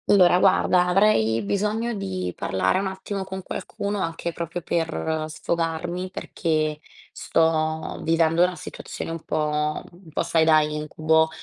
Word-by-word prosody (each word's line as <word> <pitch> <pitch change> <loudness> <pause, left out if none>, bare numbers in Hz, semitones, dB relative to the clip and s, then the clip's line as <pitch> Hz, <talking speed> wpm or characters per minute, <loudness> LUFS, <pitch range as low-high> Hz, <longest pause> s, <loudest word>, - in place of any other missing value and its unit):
Allora, 180 -3 +6
guarda, 185 -1 +4
avrei 180 - +3
bisogno 210 - -1
di 95 - -3
parlare 95 - +1
un 195 - -1
attimo 190 +1 -4
con 190 0 -6
qualcuno, 200 +2 -4
anche 165 0 -3
proprio 170 +1 -4
per 160 -1 -1
sfogarmi, 170 +3 -2
perché 155 -5 -1 0.3
sto 160 -1 0
vivendo 165 +1 +2
una 180 0 +1
situazione 165 - -7
un 165 -1 -6
po' 150 0 0
un 175 -1 -17
po', - - 0
sai, 165 -1 +2
da 160 -1 +6
incubo, 155 +1 +1
165 Hz, 135 wpm, -24 LUFS, 155-185 Hz, 0.3 s, Allora